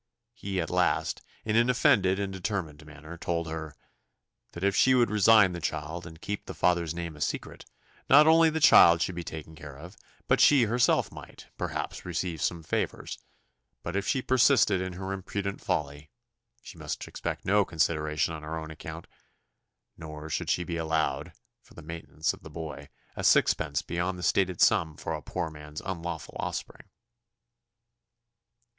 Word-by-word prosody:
He 95 -4 -4
at 80 - -3
last, - - +1 0.2
in 110 0 0
an 120 +2 +4
offended 95 -6 +3
and 100 -1 -3
determined 90 -6 -4
manner, 80 +3 -11
told 85 -1 -2
her 80 -2 -6 0.8
"That 85 - -7
if 100 0 +2
she 130 +4 +5
would 120 -3 +3
resign 105 -2 +6
the 85 - -6
child, 80 +3 -4
and 80 0 -12
keep 105 +3 -5
the - - -7
father's 85 -2 +1
name 85 -2 -5
a 75 - -12
secret, - - -4 0.4
not 145 +3 +8
only 165 +1 +6
the 160 +1 -2
child 85 - +7
should 95 - -3
be 85 0 -5
taken 80 -1 -8
care 75 -3 -10
of, 90 +7 -11 0.3
but - - +3
she 140 -4 +6
herself 120 +2 +2
might, - - -12
perhaps, - - -4
receive 85 -2 -3
some 85 -2 -1
favours; - - -3 0.6
but 85 - -5
if 100 - -1
she 130 - 0
persisted 130 -6 +4
in 95 -1 -4
her 95 +2 -5
imprudent 100 +1 -4
folly, 75 +1 -3 0.5
she 90 - -12
must 75 -1 -5
expect - - -5
no 100 +1 +4
consideration 80 -2 0
on 80 - -7
her 80 +2 -5
own 80 0 -7
account; 80 +1 -8 0.9
nor 75 -1 -8
should 80 0 -2
she 90 - +1
be 85 -1 -4
allowed, 80 -1 -1 0.3
for - - -21
the 85 - -11
maintenance 80 -1 -3
of - - -14
the - - -11
boy, 75 -3 -8 0.3
a - - -5
sixpence 70 0 +3
beyond 90 +2 -2
the 90 - -7
stated 95 -3 +1
sum 85 -8 +3
for 80 - -4
a 75 - -4
poor 85 +2 -4
man's 75 0 -9
unlawful 85 -6 -5
offspring." - - -5
85 Hz, 170 wpm, -28 LUFS, 80-95 Hz, 0.9 s, not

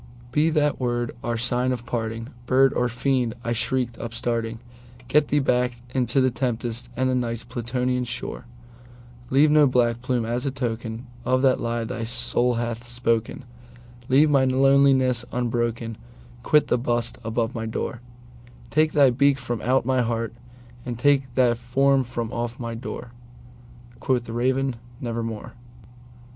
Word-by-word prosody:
"Be 150 +5 +3
that 150 -2 +1
word 120 -2 -1
our 120 -1 -1
sign 125 +2 +1
of 120 -2 -3
parting, 115 0 -3 0.2
bird 135 +1 +4
or 125 0 +1
fiend!" 125 -1 0
I 120 - -2
shrieked, 120 0 -1
upstarting:"Get 120 +3 -2
thee 150 - +1
back 125 -3 +2 0.2
into 125 0 +1
the 130 -1 +3
tempest 120 -1 -2
and 130 0 +2
the 130 - +1
Night's 115 -2 -1
Plutonian 125 +1 -2
shore! 115 - -5 0.8
Leave 145 +3 +4
no 150 -1 +6
black 120 -2 +1
plume 125 -2 -1
as 120 +2 -2
a 140 - 0
token 120 -2 -4 0.2
of 130 +1 +1
that 130 -1 +4
lie 115 0 -2
thy 115 0 -4
soul 120 +1 +1
hath 120 0 -3
spoken! 120 +1 -1 0.6
Leave 140 +4 +5
my 135 -2 +4
loneliness 130 -1 +4
unbroken! 120 -2 -2 0.4
quit 150 - +4
the 125 - +2
bust 120 -1 -1
above 115 +1 -1
my 115 -1 -4
door! 115 +1 -4 0.7
Take 155 +1 +2
thy 140 -4 +6
beak 140 +3 +3
from 120 -3 -4
out 130 +1 +2
my 130 0 +2
heart, 115 -1 -2 0.5
and 120 -2 -5
take 135 0 +2
thy 125 -2 +4
form 135 +3 +2
from 120 -2 -4
off 120 +2 -3
my 115 -1 -4
door!"Quoth 120 +1 -6
the 115 - -8
Raven, 130 +1 0 0.2
"Nevermore." 115 -4 -4
120 Hz, 150 wpm, -24 LUFS, 115-130 Hz, 0.8 s, no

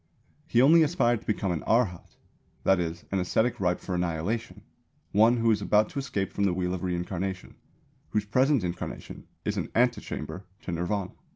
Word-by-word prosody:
He 120 - +4
only 165 +4 +7
aspired 120 - +2
to - - -21
become 100 -3 0
an 85 - -2
Arhat, 110 -7 +1 0.5
that 95 -1 +4
is 85 0 -3
"an 95 - +1
ascetic 110 +6 +1
ripe 90 -2 +1
for 95 - -5
annihilation," 90 +7 -2 0.5
one 115 +4 +5
who 115 0 +3
is 105 -2 +1
about 105 +1 +3
to 145 - -4
escape 105 -8 -3
from 100 - +1
the 90 -3 +1
wheel 90 0 -1
of 95 - -4
reincarnation 90 +1 -3 0.6
whose 105 -1 0
present 130 +2 +3
incarnation 90 0 -6 0.2
is - - -1
an - - -2
antechamber 100 -8 -1 0.2
to - - -4
Nirvāna. 90 +3 -2
100 Hz, 175 wpm, -27 LUFS, 90-115 Hz, 0.6 s, only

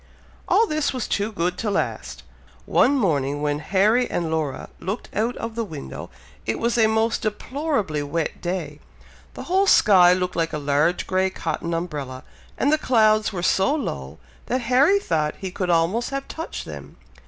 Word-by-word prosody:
All 455 - +4
this 310 -8 -1
was 255 -3 -3
too 205 +2 -1
good 180 -2 -2
to 220 - -1
last! 110 - -3 0.4
One 280 +4 +3
morning, 145 - 0
when 145 0 0
Harry 210 +9 +2
and 165 -2 -2
Laura 155 -4 -2
looked 195 +7 -5
out 230 +4 0
of 230 0 -5
the 230 0 -2
window, 155 - -8 0.3
it 110 - -2
was 235 0 0
a 225 -2 +4
most 220 +1 +1
deplorably 215 - -2
wet 150 +3 -3
day. 180 +1 -4 0.6
The - - -6
whole 380 +3 +2
sky 185 - +6
looked 180 0 -2
like 165 -1 -1
a - - -1
large 145 +4 +1
grey 190 0 +1
cotton 165 -1 -3
umbrella, 145 -7 -5 0.3
and 285 +3 +2
the 310 - +3
clouds 215 -5 +3
were 180 -4 -4
so 195 +11 +2
low 70 - -5 0.3
that 255 +1 0
Harry 260 +11 +4
thought 155 - -1
he 190 -2 -5
could 180 0 -3
almost 175 +8 +1
have 275 0 -4
touched 325 +1 -6
them. - - -10
190 Hz, 175 wpm, -23 LUFS, 160-235 Hz, 0.6 s, sky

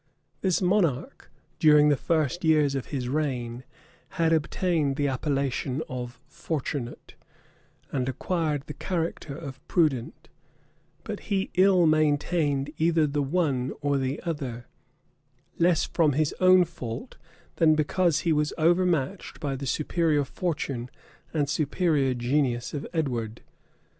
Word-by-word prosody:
This 190 -1 +1
monarch, 180 -8 0 0.3
during 150 -1 +6
the 145 - +4
first 160 +3 0
years 155 -3 +3
of 135 -2 -3
his 130 -4 -3
reign, 125 -4 -2 0.5
had 165 -1 +3
obtained 160 -2 0
the 145 0 0
appellation 135 0 -1
of 125 -1 -6
Fortunate, 140 -5 -5 0.8
and 130 -1 -1
acquired 150 +1 -1
the 150 - -7
character 165 -5 -3
of 140 -5 -8
prudent; 150 -9 0 0.8
but - - -5
he 195 -2 0
ill 185 -1 +5
maintained 150 -2 +1
either 165 -1 +3
the 145 0 -1
one 140 -4 0
or 145 -1 0
the 135 +2 -2
other; 135 -8 -4 0.9
less 170 -1 +3
from 155 -4 +2
his 150 +1 +1
own 185 -1 +6
fault, 120 -9 -7 0.4
than 155 -2 +5
because 155 +1 +1
he 165 -2 +2
was 150 0 0
overmatched 170 -1 +1
by 140 -4 -2
the 135 +1 -5
superior 155 0 +1
fortune 140 -6 -3 0.4
and 150 -3 0
superior 145 -2 +1
genius 120 -1 0
of 145 -1 -4
Edward. 120 -8 -2
150 Hz, 125 wpm, -26 LUFS, 135-165 Hz, 0.9 s, during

